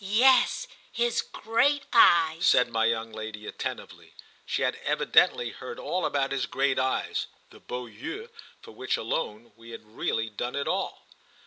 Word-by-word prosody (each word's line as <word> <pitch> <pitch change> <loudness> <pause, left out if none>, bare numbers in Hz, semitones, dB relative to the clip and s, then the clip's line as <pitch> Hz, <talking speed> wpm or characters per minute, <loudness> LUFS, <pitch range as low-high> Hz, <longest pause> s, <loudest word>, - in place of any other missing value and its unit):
"Yes, 250 - +4 0.2
his 240 0 0
great 275 +6 0
eyes," 170 -5 +5
said 125 -5 +4
my 115 -1 +1
young 115 0 -1
lady 110 -1 -7
attentively. - - -7 0.3
She - - -1
had - - +1
evidently 480 - +3
heard 465 - -8
all - - -1
about 140 -1 -1
his 135 -1 -1
great 135 -1 0
eyes—the 130 0 -3
beaux 125 0 -6
yeux 135 - -8 0.3
for - - -12
which - - -2
alone 115 -5 -4
we 115 0 -15
had 115 -1 -10
really 110 0 -1
done 120 +4 -4
it 140 - -2
all. - - -2
135 Hz, 150 wpm, -27 LUFS, -, 0.3 s, eyes